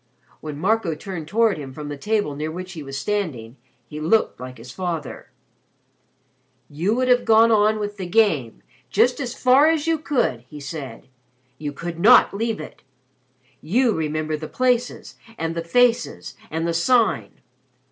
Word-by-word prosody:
When 150 -2 -7
Marco 195 -1 0
turned 165 -2 -7
toward 220 0 +2
him 135 -3 -8
from 150 -1 -7
the 145 - -5
table 205 -1 -1
near 155 +2 -3
which 180 +3 -7
he 160 - -7
was 135 -1 -6
standing, 140 - -3 0.3
he 150 - -8
looked 170 - +1
like 125 0 -8
his 120 +2 -11
father. 170 -2 -5 1.4
"You 175 +9 0
would 255 +1 0
have 245 -1 +4
gone 225 +1 +5
on 215 0 +3
with 205 0 -4
the 185 -2 -5
Game 175 - +1 0.3
just 250 - +2
as 250 -3 -4
far 260 +4 +5
as 320 -2 +1
you 325 -1 +1
could," 260 - 0
he 150 - -9
said. 140 -2 -8 0.5
"You 145 -1 -4
could 170 +3 -6
not 200 +2 +6
leave 225 +2 -2
it. - - -10 0.8
You 235 +8 +2
remember 155 -1 -2
the 155 +1 -6
places, 250 +2 -1 0.2
and 165 0 -2
the 165 0 -4
faces, 245 +6 +1 0.2
and 160 +1 -2
the 170 - 0
Sign. 230 +8 +1
175 Hz, 165 wpm, -22 LUFS, 150-225 Hz, 1.4 s, not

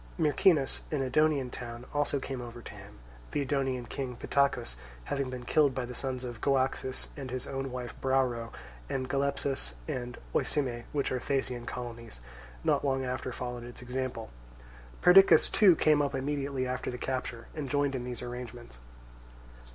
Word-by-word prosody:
Myrcinus, 155 -2 +3
an 145 -3 +1
Edonian 140 -2 +2
town, 120 0 -7
also 145 -1 +1
came 130 -1 -4
over 120 -1 -8
to - - -8
him; - - -12 0.3
the 145 - -1
Edonian 135 -3 0
king 130 -3 -4
Pittacus 130 - +1 0.3
having 135 - -1
been 125 -1 -6
killed 145 0 +4
by 130 -2 -1
the 125 - -7
sons 130 0 -3
of 120 -2 -6
Goaxis 130 -1 +1
and 135 -3 -6
his 125 0 -3
own 135 -1 -3
wife 125 -2 -5
Brauro; 130 -4 +1 0.4
and 130 -1 -1
Galepsus 135 - -1
and 125 -1 -4 0.2
Oesime, 125 -5 0
which 140 -2 0
are 130 - 0
Thasian 125 -2 -1
colonies, 115 - -6 0.4
not - - +3
long 135 -2 +1
after 130 0 -3
followed 125 -1 -4
its 120 +1 -8
example. 125 -2 -3 0.7
Perdiccas 190 +2 +8
too 190 -5 +7
came 150 -1 +4
up 140 -1 0
immediately 135 -1 -1
after 125 0 -2
the 125 - -4
capture 125 -3 -3
and 145 -4 -4
joined 145 0 +2
in 130 -2 -2
these 125 0 -4
arrangements. 120 - -7
130 Hz, 160 wpm, -30 LUFS, 125-140 Hz, 0.7 s, Perdiccas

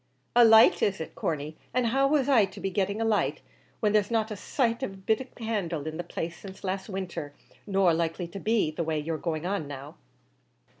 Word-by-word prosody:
"A 240 - +8
light 225 -1 +7
is 200 -1 +1
it, 160 - -6
Corney; 155 -1 -3 0.2
and 250 -1 +2
how 270 +4 +3
was 280 -2 +2
I 245 -7 +5
to 195 +1 -11
be 195 - -2
getting 200 +2 0
a 225 - 0
light, 220 -2 +1 0.4
when 210 -1 +2
there's 210 -2 +3
not 225 -1 +1
been - - -4
a - - -7
sighth 235 +3 0
of 230 -7 -3
a - - -12
bit 220 +5 0
of 260 - -11
candle 195 -10 -2
in 155 0 -4
the 175 - -3
place 170 0 -5
since 190 -1 -11
last 190 +2 -3
winter, 180 -7 -5 0.3
nor 195 -3 +3
likely 165 +1 -1
to 195 - -7
be 215 -6 +1
the 160 +2 -3
way 160 -1 -1
you're 155 +1 -3
going 160 -1 -3
on 185 -5 -2
now." 140 +1 -9
195 Hz, 230 wpm, -28 LUFS, 165-220 Hz, 0.4 s, A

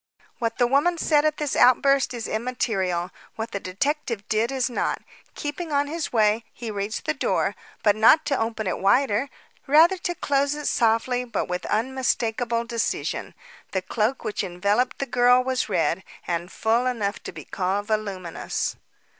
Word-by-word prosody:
What 230 -2 -1
the 245 - +3
mother 290 +7 +2
said 300 -2 +3
at 305 0 +1
this 295 -2 -2
outburst 270 +1 +4
is 240 -3 -4
immaterial. 200 -7 -1 0.2
What 225 0 -5
the 200 - -3
detective 230 +3 -2
did 225 +3 +1
is 260 -2 0
not. 245 - -1 0.4
Keeping 300 +3 -4
on 285 0 +2
his 320 +2 -4
way, 220 -1 +3
he 235 -3 -6
reached 205 +1 -4
the - - +1
door, - - 0 0.3
but 205 -2 +4
not 260 +8 +6
to 275 - 0
open 225 -1 -2
it 185 - -2
wider; 235 +4 +2 0.4
rather 325 +7 +6
to 350 -1 -3
close 280 -1 +1
it 295 0 -6
softly 235 +2 +2
but 245 - -3
with 180 0 -3
unmistakable 235 -1 0
decision. 235 -1 -2 0.4
The 190 -1 -1
cloak 225 +6 -1
which 210 - -2
enveloped 200 +7 0
the 275 - -2
girl 250 0 +4
was 260 -3 -1
red, 170 0 +1 0.2
and 175 +1 -3
full 230 +3 +1
enough 215 -5 -2
to - - -7
be - - -10
called 195 +2 -1
voluminous. 200 -5 -3
235 Hz, 165 wpm, -24 LUFS, 205-275 Hz, 0.4 s, not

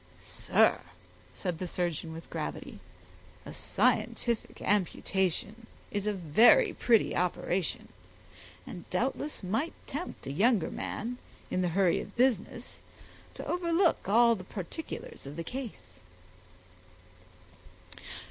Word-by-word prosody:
"Sir," - - +2 0.5
said 180 -4 -3
the 185 - -3
surgeon, 170 -2 -2
with 165 +1 -8
gravity, - - -5 0.7
"a - - -7
scientific 235 -2 0
amputation 200 +2 0 0.2
is 205 0 -2
a - - +3
very 215 - +5
pretty 230 -3 +3
operation, 180 0 -1 0.8
and - - -9
doubtless 275 -1 -1
might 225 - -1
tempt 300 +6 -6
a - - -3
younger 200 - +3
man, 245 +3 -4 0.3
in 185 - +1
the 180 - +2
hurry 185 -4 +4
of 200 - -10
business, 240 -5 0 0.5
to - - -7
overlook 345 - +2
all 235 +2 +6
the 190 -5 -5
particulars 190 - -7
of 140 - -7
the 165 - -4
case." 220 - -7
205 Hz, 110 wpm, -30 LUFS, 180-245 Hz, 0.8 s, all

